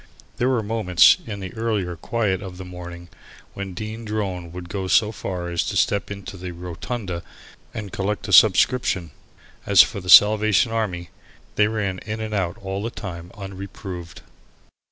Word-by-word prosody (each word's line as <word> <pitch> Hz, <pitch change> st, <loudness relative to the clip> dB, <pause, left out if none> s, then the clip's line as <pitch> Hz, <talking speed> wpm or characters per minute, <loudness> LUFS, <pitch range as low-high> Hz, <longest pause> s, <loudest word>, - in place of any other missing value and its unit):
There 125 Hz, -, +1 dB
were 125 Hz, -4 st, +1 dB
moments, 105 Hz, -5 st, +5 dB
in 100 Hz, -3 st, -5 dB
the 95 Hz, -1 st, -6 dB
earlier 105 Hz, -6 st, -2 dB
quiet 100 Hz, -1 st, -1 dB
of 95 Hz, -2 st, -8 dB
the 95 Hz, -, -8 dB
morning, 85 Hz, -1 st, -9 dB, 0.5 s
when 95 Hz, -2 st, -6 dB
Dean 110 Hz, +3 st, -6 dB
Drone 95 Hz, -6 st, -3 dB
would 90 Hz, 0 st, -8 dB
go 95 Hz, 0 st, -4 dB
so 95 Hz, +4 st, +3 dB
far 90 Hz, -4 st, -5 dB
as 85 Hz, -1 st, 0 dB
to -, -, -2 dB
step 100 Hz, -, +1 dB
in 100 Hz, -1 st, -7 dB
to 95 Hz, -, -8 dB
the 90 Hz, 0 st, -6 dB
"rotunda" 90 Hz, +2 st, -5 dB, 0.5 s
and 105 Hz, -3 st, -6 dB
collect 100 Hz, 0 st, -2 dB
a -, -, -2 dB
subscription. 95 Hz, -, +4 dB, 0.6 s
As -, -, +8 dB
for 100 Hz, -, -5 dB
the 90 Hz, -, -8 dB
Salvation 110 Hz, +2 st, +7 dB
Army, 95 Hz, -6 st, -2 dB, 0.4 s
they 105 Hz, -, +3 dB
ran 100 Hz, -4 st, -2 dB
in 110 Hz, +1 st, -5 dB
and 110 Hz, -1 st, -4 dB
out 95 Hz, -4 st, -1 dB
all 95 Hz, +1 st, -3 dB
the 115 Hz, -, -2 dB
time 90 Hz, -5 st, -8 dB
unreproved. 95 Hz, -3 st, -8 dB
95 Hz, 170 wpm, -23 LUFS, 90-110 Hz, 0.6 s, As